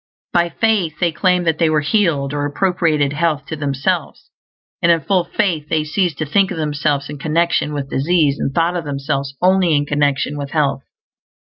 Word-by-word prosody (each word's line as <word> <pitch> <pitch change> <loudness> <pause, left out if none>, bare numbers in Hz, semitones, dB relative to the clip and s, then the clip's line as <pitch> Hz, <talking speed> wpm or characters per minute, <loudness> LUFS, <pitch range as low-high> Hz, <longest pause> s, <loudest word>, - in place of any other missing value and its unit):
By 170 0 +2
faith 185 -5 0
they 175 -2 +2
claimed 180 +2 +1
that 160 -1 0
they 165 -2 +3
were 155 -1 +2
healed, 145 -5 +1
or 145 0 -1
appropriated 155 -3 0
health 150 -2 0
to 160 - -3
themselves; 140 -3 -2 0.5
and 170 - +4
in 165 -1 +2
full 185 +4 +1
faith 165 -4 -1
they 155 -1 +1
ceased 165 0 -1
to 155 - -2
think 195 +6 +2
of 180 - -5
themselves 145 -2 -1
in 145 -1 -8
connection 160 0 0
with 140 -2 -5
disease 145 0 +1
and - - -1
thought 170 +4 +1
of 175 - -2
themselves 140 -1 -3
only 185 -3 +4
in 145 0 +1
connection 145 0 0
with 140 -1 -5
health. 145 -4 +1
155 Hz, 185 wpm, -18 LUFS, 145-170 Hz, 0.5 s, and